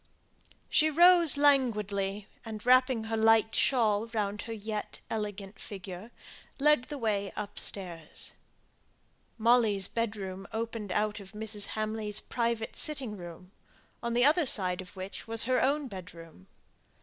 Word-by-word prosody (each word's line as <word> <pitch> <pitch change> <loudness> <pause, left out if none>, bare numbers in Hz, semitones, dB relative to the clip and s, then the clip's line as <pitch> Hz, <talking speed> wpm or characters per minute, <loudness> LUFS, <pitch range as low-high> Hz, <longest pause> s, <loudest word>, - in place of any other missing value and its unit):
She 310 0 +3
rose 340 -1 +6
languidly, 210 -8 +1 0.2
and 220 -1 -8
wrapping 255 -2 +4
her 225 0 -3
light 225 0 +4
shawl 225 -4 +2
round 210 -2 -2
her - - -4
yet 215 -1 -5
elegant 205 -2 -5
figure, 190 +1 -8 0.5
led 300 -2 +3
the 295 - -6
way 205 -5 -1
upstairs. 185 -5 -4 1.0
Molly's 220 -4 +3
bedroom 200 -4 -4
opened 225 -3 -4
out 210 +2 0
of 195 0 -13
Mrs. 210 -1 -1
Hamley's 215 -1 0
private 235 -1 -2
sitting 270 -8 +1
room; 175 0 -11 0.5
on 235 0 -2
the 245 +2 +4
other 310 +1 +4
side 185 -5 +2
of 185 +2 -13
which 190 +3 -8
was 225 0 -1
her 255 +2 +1
own 285 +1 +1
bedroom. 170 - -11
215 Hz, 130 wpm, -30 LUFS, 200-240 Hz, 1.0 s, rose